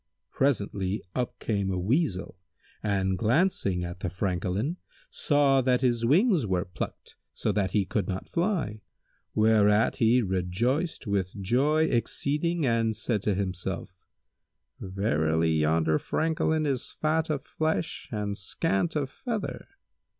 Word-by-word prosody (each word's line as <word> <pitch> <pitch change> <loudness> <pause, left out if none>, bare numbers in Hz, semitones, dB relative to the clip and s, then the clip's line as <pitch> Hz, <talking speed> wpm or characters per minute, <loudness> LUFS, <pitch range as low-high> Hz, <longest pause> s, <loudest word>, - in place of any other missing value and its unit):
Presently 100 -7 0
up 125 -2 -2
came 100 -3 -1
a 95 - -1
Weasel[FN#168] 105 - 0 0.5
and 95 -3 0
glancing 110 - +1
at 90 +1 -6
the 95 - -2
Francolin, 95 - -2 0.3
saw 140 -2 +3
that 125 -1 +2
his 120 -3 +1
wings 175 - +4
were 90 0 0
plucked, 90 - -7 0.2
so - - -1
that 100 -3 0
he 100 -3 +2
could 95 0 -1
not 95 -1 -4
fly, 170 - -1 0.5
whereat 110 0 +4
he 120 +2 +4
rejoiced 105 - -1
with 100 -1 -2
joy 135 +11 +2
exceeding 150 +5 0
and 115 -2 +1
said 110 -1 -1
to 100 -1 0
himself, 90 -1 -4 0.7
"Verily 80 -4 +1
yonder 80 0 +2
Francolin 160 -1 0
is 135 -4 -2
fat 160 +1 0
of 145 -3 -1
flesh 160 +1 -2
and 105 -2 -2
scant 95 - -1
of 145 -3 0
feather." 225 - -5
110 Hz, 130 wpm, -27 LUFS, 95-145 Hz, 0.7 s, wings